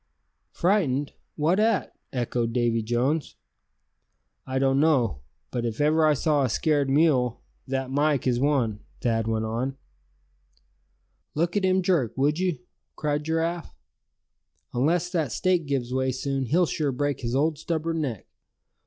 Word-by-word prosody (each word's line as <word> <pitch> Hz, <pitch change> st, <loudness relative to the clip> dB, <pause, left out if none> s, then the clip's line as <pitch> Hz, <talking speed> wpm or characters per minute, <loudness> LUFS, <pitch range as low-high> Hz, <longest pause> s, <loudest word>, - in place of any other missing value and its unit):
"Frightened; 155 Hz, -8 st, +1 dB, 0.2 s
what 165 Hz, +6 st, +2 dB
at?" 215 Hz, -, +1 dB, 0.2 s
echoed 120 Hz, -2 st, -1 dB
Davy 120 Hz, -1 st, +1 dB
Jones. 125 Hz, +7 st, -1 dB, 1.1 s
"I 130 Hz, 0 st, -2 dB
don't 135 Hz, 0 st, +3 dB
know; 130 Hz, -, +2 dB, 0.3 s
but 120 Hz, -, -2 dB
if 115 Hz, -2 st, -3 dB
ever 155 Hz, +2 st, +4 dB
I 150 Hz, -, +4 dB
saw 150 Hz, 0 st, +2 dB
a 130 Hz, -, +1 dB
scared 145 Hz, +3 st, +1 dB
mule, 135 Hz, -5 st, +2 dB, 0.2 s
that 135 Hz, 0 st, -2 dB
Mike 145 Hz, -1 st, +1 dB
is 125 Hz, -2 st, +2 dB
one," 130 Hz, -7 st, +1 dB, 0.2 s
Thad 115 Hz, -3 st, 0 dB
went 110 Hz, 0 st, 0 dB
on. 125 Hz, +5 st, -2 dB, 1.6 s
"Look 170 Hz, +4 st, 0 dB
at 200 Hz, -2 st, +2 dB
him 185 Hz, 0 st, +2 dB
jerk, 160 Hz, -, +1 dB
would 145 Hz, +4 st, +2 dB
you?" 185 Hz, -3 st, 0 dB, 0.4 s
cried 150 Hz, -1 st, -1 dB
Giraffe. 165 Hz, +2 st, -2 dB, 1.0 s
"Unless 165 Hz, +8 st, +1 dB
that 160 Hz, -9 st, 0 dB
stake 180 Hz, +3 st, +1 dB
gives 130 Hz, -3 st, -1 dB
way 130 Hz, 0 st, +1 dB
soon, 135 Hz, 0 st, -2 dB
he'll 175 Hz, +8 st, +3 dB
sure 150 Hz, -3 st, -1 dB
break 145 Hz, +1 st, -1 dB
his 120 Hz, -1 st, -2 dB
old 150 Hz, +2 st, +1 dB
stubborn 165 Hz, 0 st, -2 dB
neck. 120 Hz, -10 st, -4 dB
140 Hz, 145 wpm, -26 LUFS, 125-160 Hz, 1.6 s, ever